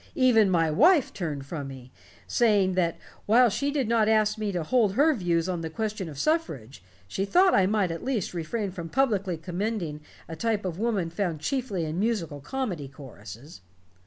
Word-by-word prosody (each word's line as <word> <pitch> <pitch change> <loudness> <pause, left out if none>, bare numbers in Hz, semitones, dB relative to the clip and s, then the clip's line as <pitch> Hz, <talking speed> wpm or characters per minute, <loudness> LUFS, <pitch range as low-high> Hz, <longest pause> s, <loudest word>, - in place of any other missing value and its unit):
Even 245 - +4
my 165 -3 +2
wife 300 - +4
turned 150 -7 -4
from 145 -1 -5
me, 130 -2 -11 0.3
saying 205 -5 +2
that 175 -2 0 0.3
while 240 +3 +6
she 280 +7 -1
did 280 -5 -1
not 225 -1 +2
ask 215 -1 +3
me 215 -2 -3
to 175 -3 -2
hold 215 +2 +2
her 295 +8 +4
views 175 - 0
on 180 -2 -2
the 160 - -4
question 210 0 -4
of 145 - -10
suffrage, 145 - -2 0.3
she 190 - -2
thought 360 - +4
I 190 -1 +4
might 200 -4 +1
at 165 - -6
least 245 -10 -2
refrain 190 +5 -3
from 170 -2 -7
publicly 205 -9 0
commending 175 -2 -4 0.3
a 165 - -7
type 220 +1 -1
of 180 -1 -4
woman 205 -7 -1
found 170 -4 -2
chiefly 235 - -2
in 155 +3 -3
musical 195 -10 -1
comedy 180 - -4
choruses. 130 - -12
190 Hz, 185 wpm, -26 LUFS, 165-225 Hz, 0.3 s, while